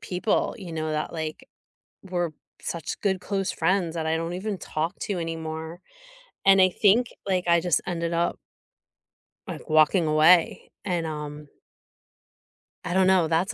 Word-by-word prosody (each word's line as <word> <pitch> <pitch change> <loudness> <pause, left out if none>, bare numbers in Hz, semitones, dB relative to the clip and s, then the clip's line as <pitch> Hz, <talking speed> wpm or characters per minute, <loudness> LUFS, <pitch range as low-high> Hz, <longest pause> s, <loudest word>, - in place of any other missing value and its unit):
people, 205 -2 -1
you 180 -4 -8
know, 155 -1 -3
that, 155 0 -2
like, 160 -1 -5 0.6
were 175 -4 -2 0.3
such 170 -2 -4
good, 190 -2 +1
close 195 -2 -2
friends 170 0 0
that 160 -1 -2
I 160 0 +1
don't 165 +1 -3
even 200 +2 -3
talk 160 +5 -3
to 200 -3 -2
anymore. 160 0 -5 0.7
And 195 -1 +7
I 185 - +6
think, 215 +6 +3 0.2
like, 185 -2 0
I 170 -1 +4
just 175 -3 +1
ended 170 -1 -2
up 170 +1 0 1.1
Like - - -8
walking 155 +3 +4
away 160 +3 +4
and, 175 -3 -1
um 150 -1 -6 1.4
I - - -3
don't 190 0 +4
know. 185 -4 +4
That's 170 +7 0
170 Hz, 150 wpm, -25 LUFS, 160-185 Hz, 1.4 s, And